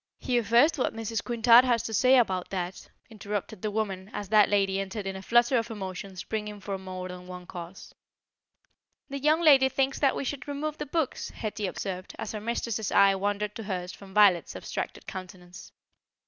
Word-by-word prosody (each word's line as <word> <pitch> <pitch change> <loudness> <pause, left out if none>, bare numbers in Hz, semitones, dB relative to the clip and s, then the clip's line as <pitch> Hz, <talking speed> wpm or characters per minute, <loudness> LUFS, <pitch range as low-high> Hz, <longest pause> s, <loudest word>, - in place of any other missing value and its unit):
"Hear 245 -2 0
first 240 +8 +4
what 255 - 0
Mrs. 225 0 -3
Quintard 235 0 +6
has 240 -3 +1
to 225 - -5
say 255 +5 +5
about 190 -7 +1
that," 185 -1 -5 0.2
interrupted 205 -1 -5
the 215 - -1
woman 200 -3 -3
as 205 -2 -5
that 210 -1 +5
lady 195 -1 +2
entered 195 +1 -4
in 195 0 -3
a 190 - -6
flutter 240 +4 +3
of 230 +1 -4
emotion 195 -2 -6
springing 210 +3 -5
from 195 -1 -5
more 185 0 -5
than 180 0 -9
one 180 -1 -8
cause. 175 +1 -9 1.2
"The 280 - -3
young 305 +4 +3
lady 275 -5 +6
thinks 270 +1 0
that 275 -2 +3
we - - -2
should 280 +2 -4
remove 295 +2 -4
the 295 - -4
books," 315 -1 -2
Hetty 210 -2 -4
observed, 185 0 -5
as - - -5
her 215 - -5
mistress's 230 -1 -2
eye 200 0 +6
wandered 205 +1 -2
to 225 - -7
hers 180 -3 -3
from 195 +2 -13
Violet's 195 -4 +4
abstracted - - -5
countenance. 185 -2 -9
210 Hz, 190 wpm, -28 LUFS, 190-240 Hz, 1.2 s, Quintard